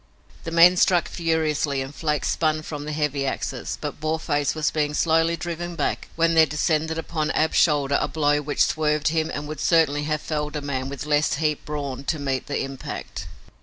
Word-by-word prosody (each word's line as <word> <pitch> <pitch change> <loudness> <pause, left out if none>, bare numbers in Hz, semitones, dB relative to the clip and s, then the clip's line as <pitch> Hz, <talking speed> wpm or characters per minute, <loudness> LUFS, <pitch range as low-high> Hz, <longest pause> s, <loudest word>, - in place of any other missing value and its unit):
The - - -3
men 170 +2 +6
struck 175 -1 +3
furiously 155 -4 0
and 135 +1 -5
flakes 150 -2 -1
spun 155 -1 0
from 150 -2 -6
the 150 - -4
heavy 150 -2 -1
axes, - - -3
but - - -5
Boarface 155 -2 -1
was 155 -1 0
being 150 -1 -1
slowly 165 +1 +2
driven 175 0 -5
back - - -2
when 165 0 +2
there 160 -1 +6
descended 155 +2 0
upon 155 -1 -2
Ab's 155 0 +1
shoulder 145 -3 +3
a - - 0
blow 145 -1 +1
which 145 0 +2
swerved 150 -1 +1
him 160 0 0
and 145 +1 -4
would 155 -1 -6
certainly 150 -4 +2
have 155 0 -1
felled 150 -1 -3
a 150 - -2
man 135 -2 -3
with 140 0 -6
less 150 0 +2
heaped 150 0 -1
brawn 140 -3 -4
to 155 - 0
meet 135 -2 -2
the 145 - -1
impact. 135 -1 -6
150 Hz, 195 wpm, -24 LUFS, 145-160 Hz, -, men